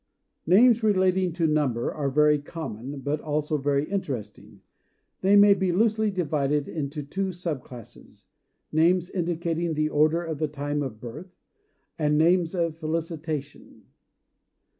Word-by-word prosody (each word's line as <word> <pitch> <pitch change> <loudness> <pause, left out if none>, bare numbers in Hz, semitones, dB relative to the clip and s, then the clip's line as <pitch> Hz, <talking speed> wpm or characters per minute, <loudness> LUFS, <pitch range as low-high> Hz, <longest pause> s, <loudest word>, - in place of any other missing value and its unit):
Names 230 +6 +5
relating 190 -3 +2
to 170 0 0
number 145 -7 0
are 145 -2 -2
very 150 +2 +3
common, 140 -3 -7
but 145 +2 -2
also 150 0 -1
very 140 +1 0
interesting. 130 - -5 0.6
They 195 +2 +4
may 205 0 +8
be 190 -2 0
loosely 220 +3 +2
divided 150 -6 -1
into 150 -1 -4
two 190 +7 -3
sub 170 -6 -4
classes, 120 -4 -14 0.5
names 175 +3 +2
indicating 170 -2 -2
the 155 0 0
order 155 +3 +2
or 165 - -3
the 155 +1 -2
time 145 0 -3
of 125 -6 -5
birth, 150 +11 -9 0.6
and 150 -1 +2
names 170 +2 +3
of 165 -2 -1
felicitation. 155 -2 -5
155 Hz, 135 wpm, -25 LUFS, 145-180 Hz, 0.6 s, may